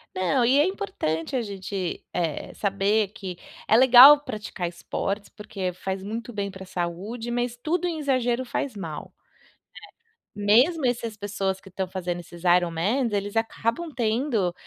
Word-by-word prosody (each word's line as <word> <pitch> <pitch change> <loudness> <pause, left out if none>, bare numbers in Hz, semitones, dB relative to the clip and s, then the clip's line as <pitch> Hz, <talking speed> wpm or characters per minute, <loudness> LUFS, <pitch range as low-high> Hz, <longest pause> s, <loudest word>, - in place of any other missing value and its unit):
Não. 215 +8 +1
E 265 +4 +4
é 295 - +5
importante 270 - -3
a 250 - +1
gente, 195 -3 -5
eh, 165 -4 -2
saber 200 +1 +1
que 190 -4 -8 0.3
é 220 - +5
legal 260 +3 +10
praticar 210 -6 -5
esportes, 195 +4 -4
porque 195 -3 -5
faz 190 +1 -5
muito 230 +4 -5
bem 200 -1 -2
pra 190 0 -10
saúde, 185 +7 -4
mas 240 0 -1
tudo 335 +7 -1
em 325 -2 -3
exagero 255 -3 0
faz 255 0 -3
mal, 165 -6 -7 1.2
né. 205 - -5
Mesmo 295 +4 +4
esses 230 -3 -1
pessoas 195 -2 -2
que 195 - -15
estão 190 0 -3
fazendo 180 -1 -4
esses 175 0 -12
IronMan, 180 +8 +2
eles 205 +1 -2
acabam 230 +8 -1
tendo 225 -5 0
210 Hz, 150 wpm, -25 LUFS, 185-245 Hz, 1.2 s, legal